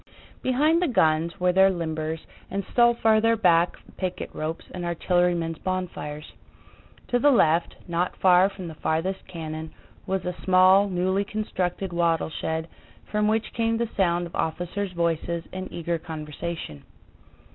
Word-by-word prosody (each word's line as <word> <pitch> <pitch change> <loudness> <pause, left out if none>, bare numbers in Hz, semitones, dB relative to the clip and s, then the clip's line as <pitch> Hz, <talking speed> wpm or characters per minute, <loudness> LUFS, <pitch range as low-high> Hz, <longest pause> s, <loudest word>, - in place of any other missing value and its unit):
Behind 300 +7 +2
the 360 - +2
guns 165 - +2
were 180 0 +3
their 190 +1 +6
limbers 160 -3 -3 0.3
and 195 0 -3
still 240 -1 +5
farther 225 0 +3
back 175 -5 +3 0.2
picket 185 -1 -4
ropes 160 +2 -4
and 180 - -6
artillerymen's 175 -1 0
bonfires. 175 -5 -4 0.8
To 245 - +2
the 290 - +5
left, 170 - +3
not 175 +1 -1
far 185 +1 +5
from 190 -3 -8
the 160 - -7
farthest 165 +5 -2
cannon, 160 -2 -6 0.4
was 190 0 -1
a 180 0 -3
small, 185 +2 +5
newly 185 +2 +1
constructed 195 -3 -3
wattle 165 -2 +1
shed 160 +1 -3 0.4
from 210 0 +1
which 220 +1 0
came 230 -1 +1
the 235 -1 -1
sound 175 -3 +2
of 170 - -10
officers' 175 +5 -2
voices 170 0 -1
in 185 0 -6
eager 170 0 -2
conversation. 155 - -6
180 Hz, 145 wpm, -25 LUFS, 165-195 Hz, 0.8 s, their